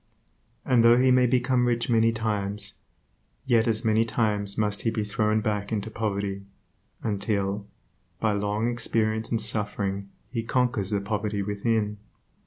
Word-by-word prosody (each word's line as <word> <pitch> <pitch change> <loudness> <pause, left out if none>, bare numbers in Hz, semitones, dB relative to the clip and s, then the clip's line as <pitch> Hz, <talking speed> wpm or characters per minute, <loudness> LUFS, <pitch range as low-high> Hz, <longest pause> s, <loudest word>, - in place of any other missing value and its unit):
And 125 -3 +4
though 115 +1 +7
he 130 +1 +4 0.2
become 125 0 +2
rich 120 -1 0
many 115 -1 +4
times, 105 -2 -3 0.7
yet 115 -1 +3
as 115 +1 0
many 110 0 +4
times 105 -3 0
must 105 -1 0
he 115 - +1
be 110 -1 -1
thrown 105 +1 +1
back 105 -1 -2
into 110 0 -2
poverty, 100 -3 -2 0.6
until, 100 -1 -1 0.5
by 110 - +2
long 105 +2 0
experience 115 -1 0
and 115 - 0
suffering 105 -2 -2 0.2
he 115 -2 -1
conquers 120 -4 0
the 100 -2 0
poverty 105 0 -2
within. 105 +1 -1
110 Hz, 140 wpm, -26 LUFS, 105-115 Hz, 0.7 s, though